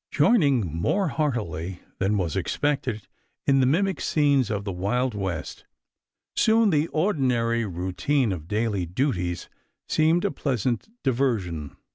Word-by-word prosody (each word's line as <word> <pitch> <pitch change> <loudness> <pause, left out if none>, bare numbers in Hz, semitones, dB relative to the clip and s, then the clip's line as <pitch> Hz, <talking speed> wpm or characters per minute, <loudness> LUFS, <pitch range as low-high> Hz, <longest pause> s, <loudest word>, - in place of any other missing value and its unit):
Joining 140 - +3
more 180 - +1
heartily 95 - -2 0.2
than 100 +2 +1
was 85 -5 -1
expected 135 -7 -1 0.4
in 135 -1 +4
the 130 - +4
mimic 190 +7 +1
scenes 140 -6 +2
of 105 -2 -2
the 100 - -3
Wild 110 +8 0
West, 95 -6 -4 0.7
soon 220 -1 +4
the 150 0 +2
ordinary 125 - +1
routine 95 - 0
of 80 -4 -5
daily 105 -3 -1
duties 90 - -1 0.4
seemed 160 +4 +2
a 200 - +1
pleasant 125 - -1
diversion. 110 - -1
120 Hz, 125 wpm, -25 LUFS, 95-145 Hz, 0.7 s, in